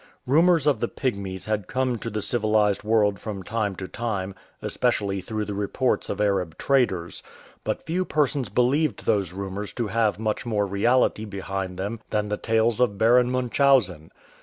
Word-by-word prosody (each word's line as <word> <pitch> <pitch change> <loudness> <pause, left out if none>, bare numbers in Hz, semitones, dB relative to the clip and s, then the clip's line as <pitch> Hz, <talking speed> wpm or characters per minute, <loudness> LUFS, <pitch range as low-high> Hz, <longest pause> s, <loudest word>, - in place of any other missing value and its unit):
Rumours 165 +3 +4
of 145 -7 +3
the 120 - 0
Pygmies 100 -9 -3
had 105 -3 -2
come 130 -2 -1
to 115 - -4
the 105 -2 -3
civilized 105 -3 +1
world 105 -3 +2
from 100 -2 -6
time 105 0 -2
to 95 +1 -6
time, 100 -3 -3 0.3
especially 100 -6 0
through 110 +2 -3
the 105 - -4
reports 105 +5 -1
of - - -3
Arab 95 -6 0
traders; 115 -11 0 0.4
but - - -3
few 180 +3 0
persons 145 - 0
believed 130 - +1
those 100 -5 +1
rumours 100 +2 -4
to 115 -4 -2
have 110 -1 +1
much 110 +2 -2
more 105 -4 0
reality 110 +3 +2
behind 95 -2 -5
them 100 +4 -3
than 105 -1 -1
the 105 - -1
tales 115 +1 +1
of 120 -5 +2
Baron 120 +3 +4
Munchausen. 125 - +2
110 Hz, 165 wpm, -25 LUFS, 100-125 Hz, 0.4 s, Rumours